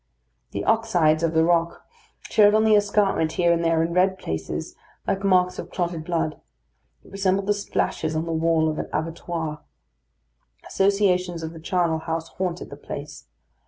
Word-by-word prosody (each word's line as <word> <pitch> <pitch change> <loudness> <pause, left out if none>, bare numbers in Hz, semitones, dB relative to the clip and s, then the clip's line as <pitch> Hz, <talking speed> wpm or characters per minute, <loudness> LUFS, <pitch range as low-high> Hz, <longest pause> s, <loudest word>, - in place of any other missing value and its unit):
The - - -4
oxydes 180 -9 +2
of 165 -1 0
the 160 - +5
rock 170 0 +1 0.4
showed 210 0 +4
on 220 - +4
the 220 -1 +5
escarpment 200 -5 +2
here 175 -1 +3
and 170 0 0
there 165 -1 +2
in 170 +1 -2
red 190 +1 +2
places, 80 - -5 0.3
like 195 +1 -1
marks 180 -2 +2
of - - -6
clotted 170 -3 -3
blood; 165 -3 -2 0.6
it - - -18
resembled 195 0 0
the 205 - +2
splashes 160 -5 -2
on 160 +1 -1
the 165 - -4
walls 160 0 +2
of 155 - -5
an - - -4
abattoir. 160 0 -4 1.1
Associations 185 -3 +1
of 160 +1 -5
the 165 - -10
charnel 170 -1 0
house 165 0 -4
haunted 180 -2 -4
the - - -8
place. - - -8
170 Hz, 165 wpm, -24 LUFS, 160-195 Hz, 1.1 s, the